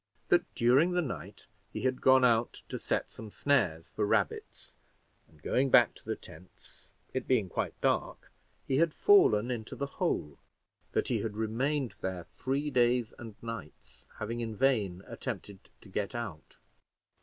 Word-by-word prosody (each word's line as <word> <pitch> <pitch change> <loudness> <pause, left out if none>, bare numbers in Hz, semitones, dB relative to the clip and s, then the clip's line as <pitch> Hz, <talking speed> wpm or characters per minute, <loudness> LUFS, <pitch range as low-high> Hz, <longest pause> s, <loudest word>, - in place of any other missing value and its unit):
That - - +3
during 135 +9 +4
the 180 - +2
night 130 - -7 0.3
he - - -5
had 130 -1 0
gone 130 -1 +6
out 115 -1 +1
to - - -4
set - - -2
some 110 - -9
snares 90 - +1
for 105 - -2
rabbits, 105 - -1 0.5
and 80 - -23
going 135 +2 +2
back - - +6
to - - -17
the - - -3
tents, 90 +4 -15 0.2
it 130 - -3
being 110 -8 +2
quite - - -3
dark, - - -1 0.4
he 135 - +1
had 165 0 +2
fallen 130 - +5
into 115 -3 -5
the 140 - -2 0.2
hole; 75 -2 -1 0.5
that - - 0
he - - +1
had 110 -2 -4
remained 125 +4 0
there 95 -2 -3
three 140 - -3
days 120 -2 +2
and 115 -3 -9
nights, 115 -10 -9
having 115 +2 -4
in 115 -2 -4
vain 105 -8 +1
attempted 100 -1 -7
to 105 - -15
get 100 +4 -3
out. 100 -10 -6
115 Hz, 160 wpm, -31 LUFS, 105-130 Hz, 0.5 s, gone